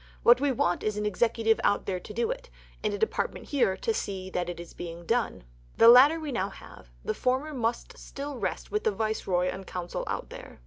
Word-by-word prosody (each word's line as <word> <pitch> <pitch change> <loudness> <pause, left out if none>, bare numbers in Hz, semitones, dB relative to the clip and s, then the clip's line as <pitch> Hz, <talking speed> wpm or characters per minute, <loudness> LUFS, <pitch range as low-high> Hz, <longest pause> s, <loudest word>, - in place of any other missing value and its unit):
What 245 +2 +7
we 285 -1 +2
want 175 -8 +1
is 215 -1 -1
an 210 - -1
Executive 225 +2 +2
out 205 - +2
there 185 -2 -2
to 180 - -11
do 230 +2 0
it, - - -7 0.3
and - - +1
a 205 - -2
Department 220 +2 -2
here 245 -10 +2
to 455 - -1
see 190 - -4
that 180 -1 -2
it 175 - -6
is 170 - -9
being 170 0 -8
done. 230 - 0 0.3
The 230 - +7
latter 275 +7 +8
we 310 -2 -4
now 200 -5 -1
have; - - -14 0.2
the - - 0
former 260 +5 -1
must 240 - -2
still 280 -2 -7
rest - - -3
with 425 - -1
the - - +3
Viceroy 195 -4 0
and 190 +1 -6
Council 175 -1 -4
out - - -4
there." - - -10
220 Hz, 220 wpm, -28 LUFS, 185-255 Hz, 0.3 s, latter